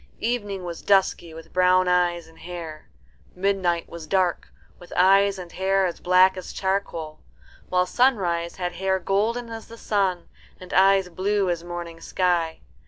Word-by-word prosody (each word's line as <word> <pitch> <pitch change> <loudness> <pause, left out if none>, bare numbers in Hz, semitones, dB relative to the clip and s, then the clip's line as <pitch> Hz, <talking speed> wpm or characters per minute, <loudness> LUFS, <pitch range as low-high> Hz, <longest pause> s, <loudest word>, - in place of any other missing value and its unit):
Evening 205 -5 -2
was 170 -1 -6
dusky, 190 -4 +2
with 165 0 -12
brown 185 0 +4
eyes 175 -1 +1
and 160 0 -19
hair; 165 -3 -8 0.5
Midnight 180 -3 0
was 170 -2 -9
dark, 185 0 0 0.3
with 175 - -15
eyes 195 +2 +5
and 180 -2 -9
hair 195 +1 +1
as 175 - -3
black 185 +1 +4
as 185 - -7
charcoal; 190 -5 -3 0.5
while 180 0 +2
Sunrise 180 -7 +1
had 180 -1 -3
hair 190 +2 0
golden 220 +6 -1
as 225 -1 -8
the 230 - -12
sun, 195 -6 -1 0.3
and 185 0 -10
eyes 195 0 +4
blue 190 +2 0
as 170 -1 -3
morning 175 -1 -7
sky. 170 -3 0
185 Hz, 155 wpm, -24 LUFS, 175-195 Hz, 0.5 s, eyes